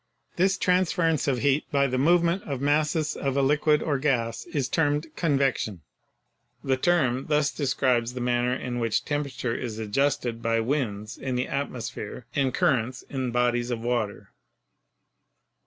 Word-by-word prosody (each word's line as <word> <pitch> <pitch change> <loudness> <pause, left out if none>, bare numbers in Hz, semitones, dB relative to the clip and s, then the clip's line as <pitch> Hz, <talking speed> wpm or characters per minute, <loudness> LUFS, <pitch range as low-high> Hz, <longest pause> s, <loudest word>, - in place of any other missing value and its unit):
This 190 +2 +2
transference 180 -4 +1
of 135 -3 +2
heat 145 +1 +2
by 140 -1 +3
the 130 -1 0
movement 170 +5 +3
of 140 -4 -3
masses 150 +2 +1
of 135 0 -2
a 140 - +3
liquid 150 +2 +3
or 145 -4 0
gas 120 -5 0
is 150 -7 -2
termed 150 +1 0
"convection." 135 - 0 0.8
The 135 - +2
term 130 -4 +1
thus 150 -1 +2
describes 125 -4 0
the - - -3
man 120 0 +1
ner 125 +1 +1
in 125 -1 -4
which 115 -2 0
temperature 140 -5 -2
is 115 -3 -4
adjusted 115 +1 0
by 115 0 +1
winds 110 -4 -2
in 130 -2 -3
the 125 +1 -1
at 140 +1 -2
mosphere 120 -1 -6
and 135 -2 +1
currents 130 -1 0
in 130 -2 -2
bodies 120 0 +1
of 120 -2 -2
water. 115 -4 -2
135 Hz, 155 wpm, -26 LUFS, 120-150 Hz, 0.8 s, by